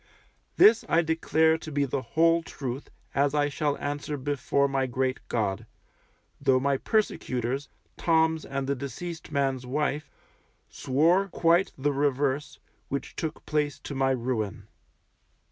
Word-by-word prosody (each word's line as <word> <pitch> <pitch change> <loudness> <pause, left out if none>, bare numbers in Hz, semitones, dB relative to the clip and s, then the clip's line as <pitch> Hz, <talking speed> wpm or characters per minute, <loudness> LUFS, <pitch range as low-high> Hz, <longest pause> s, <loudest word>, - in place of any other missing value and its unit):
This 225 +2 +7
I 170 - +4
declare 160 0 +2
to 155 - -8
be 145 -1 +1
the 135 0 -2
whole 165 +7 +3
truth, 135 -4 -6 0.2
as 140 +1 +2
I 145 0 +2
shall 145 0 -1
answer 145 +1 -3
before 140 0 0
my 135 -1 0
great 130 +1 -1
God; 100 -5 -1 0.7
though 130 -1 +4
my 140 +1 +1
persecutors, 135 - -1 0.3
Toms 160 -1 +2
and 135 0 -3
the 140 - 0
deceased 150 +5 -6
man's 135 -3 0
wife, 150 +2 -1 0.6
swore 165 +9 +2
quite 175 +1 +2
the 145 +2 0
reverse, 140 0 0 0.3
which 140 - -4
took 160 -1 -4
place 150 -2 0
to - - -6
my 135 0 +1
ruin. 120 -5 -2
140 Hz, 135 wpm, -27 LUFS, 130-160 Hz, 0.7 s, This